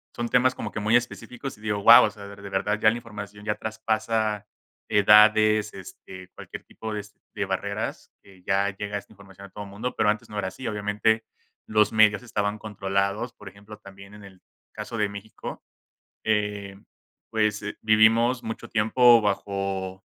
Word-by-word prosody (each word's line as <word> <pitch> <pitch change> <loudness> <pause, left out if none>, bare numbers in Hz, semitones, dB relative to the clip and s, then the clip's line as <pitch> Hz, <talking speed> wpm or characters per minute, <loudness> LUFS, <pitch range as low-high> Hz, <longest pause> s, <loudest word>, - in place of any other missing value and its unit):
son 120 -1 -3
temas 125 +1 +3
como - - -5
que - - -4
muy 110 +3 +2
específicos 120 +3 -3
y - - -20
digo: 105 -1 -2
"Guau", 115 +4 +9
o - - 0
sea, 100 -2 -12
de 100 - -10
verdad 105 +2 -1
ya 110 - +5
la 110 - -1
información 105 -3 -9
ya 105 0 -1
traspasa 110 -1 -2 0.4
edades, 105 +1 +5
este, 95 0 -11
cualquier - - -9
tipo 110 -1 -7
es 105 0 -7 0.2
de - - -2
barreras, - - -4
que 95 -2 -19
ya 100 +1 +1
llega 105 0 -4
esta 100 - -11
información 100 -1 -14
a - - -21
todo 105 +1 -8
mundo, 105 +6 -5
pero - - +2
antes 105 +1 -2
no 105 - -4
era 95 - -2
así. 110 +7 -8
Obviamente, 105 +2 0 0.4
los 105 -1 +3
medios 110 0 +4
estaban 105 -3 -2
controlados, 100 +2 -2
por 105 -2 -11
ejemplo, 100 +2 -13
también 100 -1 -14
en 105 0 -13
el 95 -2 -15 0.3
caso 115 - -6
de 105 -2 +1
México, 100 +2 -9 0.7
eh, 105 -2 -1 0.5
pues 105 -2 0 0.2
vivimos 115 +3 +4
mucho 110 0 -6
tiempo 115 +2 +5
bajo 95 -2 -3
105 Hz, 170 wpm, -25 LUFS, 100-110 Hz, 0.7 s, Guau